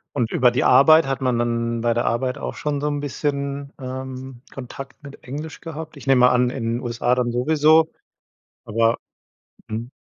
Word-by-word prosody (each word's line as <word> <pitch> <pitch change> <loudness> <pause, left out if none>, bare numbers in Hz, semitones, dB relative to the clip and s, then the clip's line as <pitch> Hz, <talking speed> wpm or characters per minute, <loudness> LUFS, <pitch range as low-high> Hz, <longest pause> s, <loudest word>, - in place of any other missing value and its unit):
Und 120 -5 0
über 125 -1 +4
die 125 - 0
Arbeit 140 +4 +6
hat 135 0 -2
man 125 -2 +1
dann 115 0 -1
bei 115 0 +1
der 120 - 0
Arbeit 125 +2 -1
auch - - -5
schon 150 -1 -2
so 150 - -1
'n 145 -1 -1
bisschen, 140 0 -3
ähm, 130 -1 -7
Kontakt 135 0 -9
mit 140 -1 -12
Englisch 150 +5 -7
gehabt? 160 -1 -8
Ich 140 - -11
nehme 125 -2 +5
an, 125 0 +2
in 125 -2 -5
den 120 - -4
USA 120 0 0
dann 125 -1 0
sowieso. 155 +5 +4 0.8
Aber 115 +1 +2 0.7
mhm. 115 +3 -5
130 Hz, 180 wpm, -22 LUFS, 120-145 Hz, 0.8 s, Arbeit